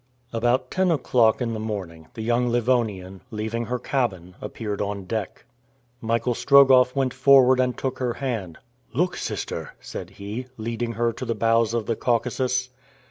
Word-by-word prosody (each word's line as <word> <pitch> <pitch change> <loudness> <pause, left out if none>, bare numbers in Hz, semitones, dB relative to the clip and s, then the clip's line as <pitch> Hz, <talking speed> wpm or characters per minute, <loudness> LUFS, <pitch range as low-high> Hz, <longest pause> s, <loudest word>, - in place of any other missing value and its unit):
About 120 +2 +1
ten 190 -1 +2
o'clock 125 -7 +3
in 115 -1 -2
the 110 - -4
morning, 95 -7 -5
the 110 - -5
young 120 +2 +1
Livonian, 110 -6 0
leaving 110 +1 -3
her 125 +2 -2
cabin, 95 -10 -2
appeared 105 -3 -4
on 100 -1 -3
deck. 110 0 -4 0.6
Michael 115 +2 0
Strogoff 130 -1 +5
went 135 -2 0
forward 130 -2 +6
and 125 -1 +1
took 130 -1 -3
her 125 -2 0
hand. 110 -11 -4 0.4
"Look, 180 +5 +1
sister!" - - -5
said - - -7
he, 105 +6 -7
leading 115 +1 -3
her 115 +1 0
to - - -7
the 115 - -2
bows 115 +1 +2
of 115 -2 -1
the 115 - -1
Caucasus. 125 +2 0
115 Hz, 160 wpm, -24 LUFS, 110-125 Hz, 0.6 s, forward